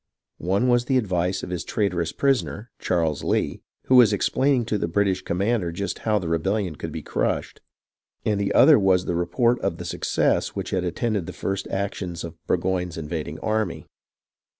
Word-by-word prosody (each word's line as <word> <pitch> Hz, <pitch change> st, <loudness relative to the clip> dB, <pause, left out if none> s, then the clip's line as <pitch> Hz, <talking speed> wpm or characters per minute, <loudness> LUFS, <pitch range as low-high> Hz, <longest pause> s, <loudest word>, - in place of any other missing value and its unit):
One 95 Hz, +8 st, +1 dB
was 120 Hz, -1 st, +3 dB
the 130 Hz, 0 st, +2 dB
ad\ 105 Hz, -7 st, -1 dB
ice 90 Hz, +2 st, 0 dB
of 90 Hz, -, -6 dB
his 90 Hz, -3 st, -3 dB
traitorous 90 Hz, -5 st, -1 dB
prisoner, 110 Hz, -, 0 dB
Charles 80 Hz, -5 st, 0 dB
Lee, -, -, 0 dB, 0.2 s
who 130 Hz, -, +4 dB
was 120 Hz, -4 st, +7 dB
explaining 130 Hz, +4 st, +2 dB
to 110 Hz, -2 st, -1 dB
the 85 Hz, -, -1 dB
British 95 Hz, +1 st, +1 dB
commander 95 Hz, +1 st, 0 dB
just 100 Hz, +4 st, -4 dB
how 110 Hz, -1 st, +1 dB
the 90 Hz, -4 st, -3 dB
rebellion 90 Hz, +2 st, 0 dB
could -, -, -6 dB
be -, -, -6 dB
crushed; -, -, -2 dB, 0.6 s
and 105 Hz, -2 st, +1 dB
the 100 Hz, -, 0 dB
other 155 Hz, -6 st, +7 dB
was 95 Hz, -2 st, +3 dB
the -, -, -1 dB
report 90 Hz, +8 st, +1 dB
of -, -, -2 dB
the -, -, -7 dB
success -, -, 0 dB
which -, -, -4 dB
had 95 Hz, -1 st, 0 dB
attended 100 Hz, +1 st, -1 dB
the -, -, -6 dB
first 95 Hz, 0 st, -3 dB
actions 95 Hz, -3 st, -3 dB
of 85 Hz, -1 st, -6 dB
Burgo} 90 Hz, +1 st, +1 dB
ne's 90 Hz, -2 st, -6 dB
invading 80 Hz, -1 st, -4 dB
army. 110 Hz, -4 st, -1 dB
95 Hz, 185 wpm, -24 LUFS, 85-110 Hz, 0.6 s, was